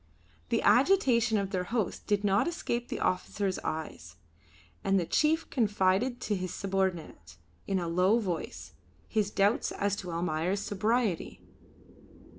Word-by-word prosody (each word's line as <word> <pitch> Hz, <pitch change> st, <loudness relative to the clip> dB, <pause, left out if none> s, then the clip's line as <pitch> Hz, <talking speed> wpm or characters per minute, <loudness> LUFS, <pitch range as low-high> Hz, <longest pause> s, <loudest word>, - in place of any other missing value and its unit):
The -, -, +1 dB
agitation 245 Hz, -, +4 dB
of 195 Hz, -1 st, -2 dB
their 180 Hz, -2 st, -1 dB
host 220 Hz, -2 st, -2 dB
did 205 Hz, -1 st, +1 dB
not 200 Hz, -, +2 dB
escape 245 Hz, -8 st, -2 dB
the -, -, -4 dB
officer's 190 Hz, +1 st, -1 dB
eyes, 120 Hz, -, -5 dB, 0.7 s
and 195 Hz, 0 st, +3 dB
the 175 Hz, -, -1 dB
chief 315 Hz, -, +2 dB
confided 210 Hz, +1 st, +1 dB
to 210 Hz, -, -1 dB
his 185 Hz, -1 st, -4 dB
subordinate, 185 Hz, -, -3 dB, 0.3 s
in 195 Hz, -, 0 dB
a 175 Hz, -2 st, -2 dB
low 180 Hz, +6 st, +3 dB
voice, 160 Hz, -, -4 dB, 0.3 s
his 210 Hz, -2 st, 0 dB
doubts 205 Hz, +2 st, +1 dB
as 200 Hz, 0 st, -1 dB
to 180 Hz, -, -6 dB
Almayer's 170 Hz, +3 st, -1 dB
sobriety. 210 Hz, -2 st, -1 dB
195 Hz, 135 wpm, -29 LUFS, 180-225 Hz, 0.7 s, agitation